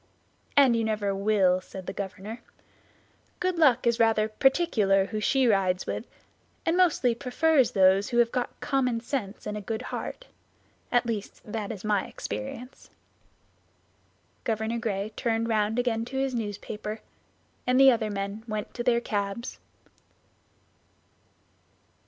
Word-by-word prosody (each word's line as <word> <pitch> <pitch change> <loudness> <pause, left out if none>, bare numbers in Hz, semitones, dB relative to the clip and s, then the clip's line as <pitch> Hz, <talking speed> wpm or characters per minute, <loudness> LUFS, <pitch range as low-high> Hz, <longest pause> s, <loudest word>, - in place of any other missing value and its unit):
"And 265 -4 +6
you 230 - +1
never 210 -2 0
will," 195 -2 +2
said 190 0 -9
the - - -5
governor. 200 +4 -6 1.0
"Good 365 -2 0
Luck 260 -7 +4
is 235 0 +2
rather 225 -2 +3
particular 215 - +2
who 215 +2 -4
she 265 +5 +2
rides 190 -5 +2
with, - - -4 0.6
and 330 - +2
mostly 330 -9 +3
prefers 260 +3 +2
those 190 0 +4
who 240 - -1
have 235 -1 +4
got 250 -1 -3
common 255 -4 +1
sense 230 -5 -4
and 210 - -3
a 210 - -4
good 220 +2 -4
heart; - - -5 0.7
at 245 0 +3
least 220 -3 -4
that 210 -1 -4
is 210 -2 -7
my 205 -2 +1
experience." 105 - -7 1.5
Governor 225 +1 -1
Gray 210 -2 -2
turned 230 -1 0
round 215 0 +1
again 240 -2 0
to 265 +2 -6
his 270 -1 0
newspaper, 210 -1 -5 0.7
and 250 +1 +4
the 270 0 +9
other 225 -3 0
men 200 +1 -4
went 215 -2 -4
to 240 - -4
their 235 -1 +3
cabs. 205 +2 -3
225 Hz, 140 wpm, -27 LUFS, 205-245 Hz, 1.5 s, the